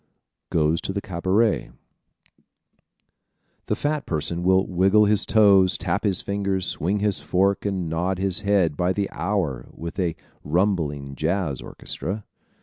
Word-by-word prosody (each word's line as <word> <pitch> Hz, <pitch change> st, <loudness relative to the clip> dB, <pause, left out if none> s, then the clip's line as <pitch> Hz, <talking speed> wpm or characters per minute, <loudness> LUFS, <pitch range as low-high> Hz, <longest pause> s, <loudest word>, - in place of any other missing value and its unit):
Goes 80 Hz, +1 st, +1 dB
to 95 Hz, -, -4 dB
the 100 Hz, -, -1 dB
Cabaret 100 Hz, +3 st, 0 dB, 0.7 s
¶ -, -, -36 dB, 1.2 s
The 105 Hz, -, +1 dB
fat 145 Hz, +4 st, -2 dB
person 85 Hz, +2 st, -1 dB
will 95 Hz, +1 st, +3 dB
wiggle 95 Hz, +4 st, +3 dB
his 105 Hz, 0 st, +1 dB
toes, 100 Hz, -4 st, +5 dB
tap -, -, -2 dB
his 100 Hz, -3 st, +3 dB
fingers, 100 Hz, -2 st, -1 dB
swing 100 Hz, +6 st, -1 dB
his 105 Hz, -2 st, +1 dB
fork 100 Hz, +2 st, +1 dB
and 95 Hz, -4 st, -2 dB
nod 90 Hz, +4 st, -1 dB
his 95 Hz, -1 st, 0 dB
head 100 Hz, -6 st, +2 dB
by 90 Hz, +4 st, +1 dB
the 100 Hz, 0 st, -1 dB
hour 85 Hz, -9 st, -2 dB
with 85 Hz, +3 st, -7 dB
a 85 Hz, -4 st, 0 dB, 0.3 s
rumbling 75 Hz, -5 st, 0 dB
jazz 80 Hz, -4 st, -1 dB
orchestra. 100 Hz, +5 st, -5 dB
95 Hz, 145 wpm, -24 LUFS, 85-100 Hz, 1.2 s, toes